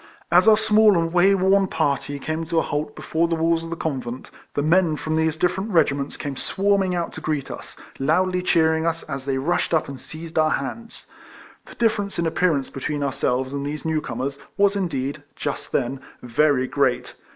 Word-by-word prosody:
As 180 +5 +5
our 215 -1 +7
small 215 -2 +5
and 165 0 0
way 190 +3 +5
worn 195 +1 +3
party 145 -3 -1
came 155 +3 -3
to 165 0 -1
a - - +4
halt 150 +1 -3
before 165 +1 0
the 165 - 0
walls 165 0 +1
of 165 - -7
the 170 - -3
convent, 130 -6 -4 0.2
the 145 - 0
men 165 0 +3
from 155 +1 -3
these 160 0 +1
different 185 +5 0
regiments 145 -6 +1
came 145 -2 -4
swarming 195 +4 +1
out 170 -1 -2
to 160 - -8
greet 155 -3 -2
us, - - -9 0.2
loudly 180 +6 +2
cheering 160 -2 +2
us 165 0 -1
as 135 -3 -6
they 135 -1 0
rushed 165 +4 0
up 160 - +1
and 135 -2 -8
seized 160 0 -5
our 155 0 +4
hands. 225 - -4 0.6
The - - -12
difference 215 -4 0
in 170 - 0
appearance 160 -4 +1
between 145 +2 -3
our 140 -2 -1
selves 130 0 -1
and 140 0 -3
these 150 +2 -5
new 160 -1 0
comers 135 +3 -4 0.2
was 200 0 +3
indeed 145 -6 -2
(just 145 - -4
then) 135 0 -1 0.2
very 130 +2 +2
great. 135 -2 0
160 Hz, 195 wpm, -23 LUFS, 140-180 Hz, 0.6 s, our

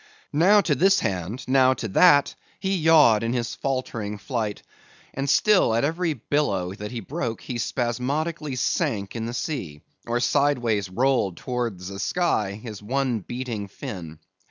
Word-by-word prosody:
Now 190 +8 +5
to 165 -5 +1
this 190 +8 +4
hand, 100 +7 -3
now 130 0 +4
to 115 - -4
that, 145 - +5 0.3
he 195 0 0
yawed 155 - +5
in 115 +1 -1
his 120 -2 -2
faltering 115 -6 -3
flight, 110 -2 -3 0.5
and 135 +1 -2
still 190 - +4
at 115 - +1
every 165 +2 0
billow 105 -9 -1
that 105 +1 -7
he 120 0 -5
broke, 120 - -4
he 120 -2 -5
spasmodically 140 +6 -2
sank 100 -4 -1
in 115 -1 -3
the 120 - -5
sea, 105 - -4 0.3
or 120 +1 0
sideways 120 -8 +1
rolled 120 -4 +1
towards 115 -7 -4
the 100 0 -7
sky 110 - 0
his 105 -1 -8
one 125 +1 -1
beating 120 -2 -5
fin. 85 -4 -8
120 Hz, 155 wpm, -24 LUFS, 105-145 Hz, 0.5 s, Now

